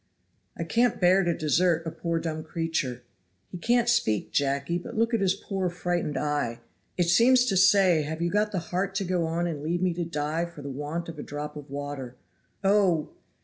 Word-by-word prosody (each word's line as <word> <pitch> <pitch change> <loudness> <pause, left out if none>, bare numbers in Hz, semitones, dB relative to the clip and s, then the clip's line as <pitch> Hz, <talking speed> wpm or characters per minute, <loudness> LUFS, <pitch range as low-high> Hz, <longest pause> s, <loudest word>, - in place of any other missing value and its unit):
"I - - -2
can't 240 0 +1
bear 185 +2 +5
to 170 -2 0
desert 165 +2 +2
a 160 - -3
poor 170 0 -2
dumb 160 -1 -3
creature. 155 -7 -3 0.5
He 180 - -7
can't 240 +5 +2
speak, 170 - +1
Jacky, 140 +4 0
but 175 - -8
look 230 +2 +1
at 225 - +2
his 190 -2 +2
poor 190 -2 -2
frightened 175 -4 -2
eye; 145 -5 -1 0.4
it 175 -2 +2
seems 245 +8 +5
to 200 - 0
say 190 -3 +5
have 155 +2 -4
you 170 0 0
got 210 +1 +1
the 195 - -2 0.2
heart 195 +2 -1
to 195 - 0
go 180 -3 0
on 170 +2 -1
and 160 -4 -3
leave 170 +4 -1
me 180 -2 +2
to 175 +1 -2
die 160 0 -2
for 170 -4 -11
the 140 - -5
want 150 +5 -4
of 165 -2 -8
a - - -3
drop 150 +1 -6
of 145 -2 -9
water. 140 -3 -6 0.5
Oh! 195 -6 +3
170 Hz, 205 wpm, -27 LUFS, 150-190 Hz, 0.5 s, bear